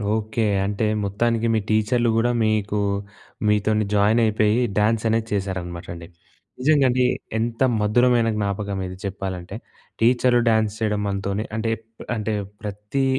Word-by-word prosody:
Okay. 110 +1 -1 0.2
అంటే 105 +2 -1 0.2
మొత్తానికి 115 +3 0
మీ 110 - +2
టీచర్లు 110 +2 +2
కూడా 120 +2 +2
మీకు, 105 -1 0 0.7
మీతోని 105 0 +2
జాయిన్ 105 +3 +3
అయిపేయి, 110 +1 +2 0.2
డ్యాన్స్ 105 +1 +2
అనేది 115 0 0
చేశారనమాట 90 -3 -3
అండి. 85 0 -10 0.5
నిజంగా 140 +1 +4
అండి 125 +1 +2 0.3
ఎంత 115 +2 -2 0.2
మధురమైన 120 +2 +3
జ్ఞాపకం 100 -1 -2
ఇది 90 0 -8
చెప్పాలంటే, 95 -1 -5 0.5
టీచరు 120 +1 +4
డ్యాన్స్ 110 -1 +2
చేయడం 105 -2 0
మనతోనే 100 +2 -2
అంటే, 115 0 -1 0.4
అంటే 110 0 -2 0.3
ప్రతి 105 +6 -2
110 Hz, 125 wpm, -23 LUFS, 100-115 Hz, 0.7 s, నిజంగా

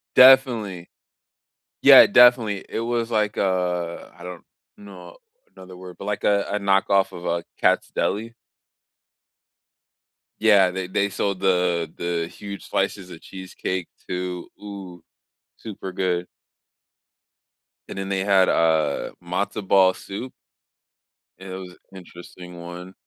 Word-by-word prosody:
Definitely 120 -9 +5 0.9
yeah, - - +9
definitely, 120 -5 +4
it - - -4
was, 115 0 -2
like, 105 -2 -1
a 90 -3 -2
I 85 - -12
don't 90 -2 -8 0.3
know 100 - -13 0.4
another 95 -1 -13
word, 90 -1 -11
but 100 - -8
like 105 -1 -3
a 100 -1 +3
a 105 - 0
knockoff 95 -1 +2
of 85 - -10
a 85 -1 -2 0.2
Katz - - +2
deli? 115 +3 -2 2.1
Yeah, 100 -4 +5
they 95 0 -5
they 100 +2 0
sold 100 -1 -2
the 90 -3 0
the 85 -1 -3
huge 100 +3 -9
slices 95 -2 -2
of 80 - -11
cheesecake, 95 -1 -6 0.2
too 90 -1 -5
ooh, 95 -4 -10 0.5
super 100 -3 -8
good. 90 -1 -1 1.6
And - - -8
then 95 0 -4
they 95 -1 -1
had, 95 -2 +3
uh, 80 -2 +1
matzo 95 +4 -3
ball 95 -1 +5
soup. 105 +8 -8 1.0
It 95 0 -11
was 95 -1 -9 0.2
interesting 90 -1 -12
one. 90 +2 -9
95 Hz, 120 wpm, -23 LUFS, 90-100 Hz, 2.1 s, yeah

